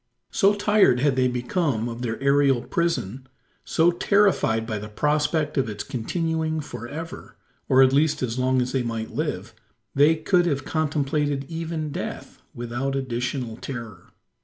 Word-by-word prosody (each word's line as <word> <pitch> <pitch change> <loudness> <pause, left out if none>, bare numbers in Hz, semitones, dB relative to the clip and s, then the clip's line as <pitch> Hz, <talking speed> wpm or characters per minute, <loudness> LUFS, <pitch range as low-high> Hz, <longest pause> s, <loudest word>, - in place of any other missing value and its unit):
So 200 +1 +3
tired 205 - +4
had 140 -2 +2
they 130 -1 +3
become 125 - -1
of 120 0 -6
their 115 -2 -3
aerial 140 -2 +3
prison 135 - -2 0.4
so 165 +2 +3
terrified 175 - +2
by 110 -2 -3
the 105 +1 -8
prospect 150 +4 0
of 130 -4 0
its 105 -1 -5
continuing 160 +6 -2
for 130 -6 -7
ever 165 +5 -8 0.3
or 130 +1 +7
at 130 0 +4
least 145 0 +2
as 120 0 -2
long 130 0 +2
as 125 - -4
they 135 - 0
might 115 -2 -4
live - - -3 0.4
they 145 +3 +5
could 175 +3 +2
have 140 -4 -1
contemplated 145 -2 -1
even 160 -2 -4
death - - -6
without 120 +3 -3
additional 125 -2 -3
terror. 115 -10 -8
135 Hz, 155 wpm, -24 LUFS, 120-160 Hz, 0.4 s, or